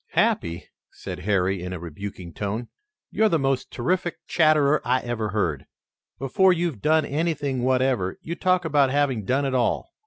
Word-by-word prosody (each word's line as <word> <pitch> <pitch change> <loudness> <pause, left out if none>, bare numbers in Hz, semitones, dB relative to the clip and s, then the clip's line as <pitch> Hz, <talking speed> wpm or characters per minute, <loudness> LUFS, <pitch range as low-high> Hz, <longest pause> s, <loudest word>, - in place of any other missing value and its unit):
"Happy," 85 0 +1 0.3
said - - -7
Harry, 95 -2 +1
in 90 +1 -5
a 90 - -5
rebuking 85 +1 -8
tone, 105 +6 -4 0.4
"you're 220 0 +3
the 165 - +2
most 135 -2 -1
terrific 175 +7 -1
chatterer 155 -2 +3
I 130 +1 +1
ever 115 -3 -3
heard. 85 -9 -1 0.5
Before 160 +9 +3
you've 170 - -1
done 155 0 +3
anything 145 -4 -1
whatever, 130 -6 +1
you 165 - -4
talk 185 0 +1
about 145 -4 +3
having 135 -6 0
done 135 +6 +1
it 135 - -1
all." 130 - 0
130 Hz, 160 wpm, -24 LUFS, 105-155 Hz, 0.5 s, you're